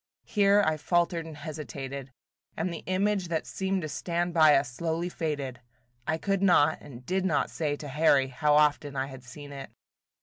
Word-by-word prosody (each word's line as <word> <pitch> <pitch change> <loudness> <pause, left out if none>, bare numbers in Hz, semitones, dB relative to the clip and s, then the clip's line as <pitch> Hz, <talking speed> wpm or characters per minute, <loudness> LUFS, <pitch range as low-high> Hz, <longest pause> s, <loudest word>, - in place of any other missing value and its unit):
Here 205 0 +4
I 155 0 +1
faltered 170 +1 0
and 155 -2 -9
hesitated, 140 -3 -6 0.5
and 170 +2 -1
the 165 - -6
image 190 0 +1
that 165 -1 -2
seemed 190 -2 -2
to - - -2
stand 170 +4 -2
by 155 -3 +6
us 135 -1 +1
slowly 165 +6 -2
faded. 145 -7 -4 0.5
I 160 - +1
could 195 +2 -1
not 160 -5 +4
and 130 -3 -12
did 185 +5 0
not 175 -6 +1
say 150 -3 -1
to 145 - -8
Harry 140 -2 +3
how 150 +3 +2
often 150 -1 +2
I 135 0 0
had 130 -2 -10
seen 145 +4 -10
it. 135 -1 -8
155 Hz, 180 wpm, -28 LUFS, 140-175 Hz, 0.5 s, by